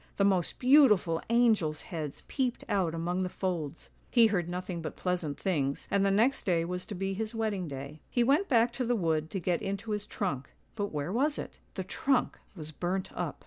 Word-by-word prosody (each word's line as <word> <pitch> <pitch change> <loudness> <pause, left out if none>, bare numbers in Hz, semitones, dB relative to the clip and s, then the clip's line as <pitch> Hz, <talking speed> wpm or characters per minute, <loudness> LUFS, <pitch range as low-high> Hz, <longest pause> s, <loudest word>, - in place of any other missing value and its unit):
" - - -34
The 200 - +3
most 185 -4 +1
beautiful 245 - +5
angels' 220 -11 +3
heads 155 -5 -5
peeped 255 -3 -1
out 180 -5 +1
among 175 +3 -1
the 185 - -1
folds." 170 -6 -4 0.2
He 235 -2 +6
heard 180 -6 +1
nothing 180 -1 -4
but 160 - -5
pleasant 175 -6 -2
things 140 -7 -1
and 200 - +3
the 200 - +3
next 225 +7 +3
day 170 -3 +1
was 180 +1 -4
to 205 - -5
be 195 +1 -2
his 220 +3 -4
wedding 210 -5 -1
day. 140 +2 -7
He 240 - +2
went 290 +11 +3
back 235 -2 +4
to 250 - -2
the 245 0 +1
wood 160 -5 0
to 195 - -3
get 175 -1 0
into 200 +2 -3
his 210 0 -2
trunk 140 -10 -3
— - - -37
but 205 -2 -1
where 150 +3 -3
was 285 +7 +1
it? - - -7 0.2
The - - -2
trunk 270 -3 0 0.2
was 155 -3 -8
burnt 180 +4 -2
up. 175 -5 -3
185 Hz, 215 wpm, -30 LUFS, 165-225 Hz, 0.2 s, He